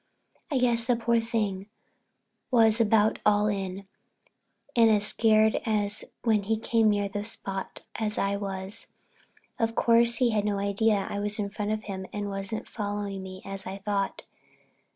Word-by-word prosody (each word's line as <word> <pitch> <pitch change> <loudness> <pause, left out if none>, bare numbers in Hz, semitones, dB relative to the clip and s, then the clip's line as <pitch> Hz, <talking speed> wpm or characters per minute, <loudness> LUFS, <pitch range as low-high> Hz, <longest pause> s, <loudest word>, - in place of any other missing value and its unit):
I 285 - 0
guess 235 -2 +2
the 245 - +4
poor 230 0 +2
thing 210 -4 -2 0.8
was 230 -2 +4
about 220 -1 +3
all 210 0 +4
in, 195 -2 -2 0.9
and 230 -2 +6
was 210 -2 +3
as - - -1
scared 220 0 +3 0.6
when 220 -3 +3
he 220 +3 0
came 225 0 +2
near 205 -1 +1
the 205 +1 -4 0.2
place 195 -1 -5 0.2
as 210 -1 -2
I 200 0 +1
was. 195 -1 -4 0.7
Of 225 0 0
course 235 0 +4
he 240 0 +2
had 210 -2 +1
no 205 -1 0
idea 200 +1 +1
I 200 - -3
was 210 +2 -1
in 200 -2 -2
front 210 0 -3
of 215 0 -2
him 190 -2 -6
and 205 -1 -3
wasn't 195 +2 -4
following 205 -2 -4
me 185 0 -9
as 195 0 -7
I 190 +1 -5
thought. 200 0 -2
210 Hz, 165 wpm, -27 LUFS, 200-225 Hz, 0.9 s, and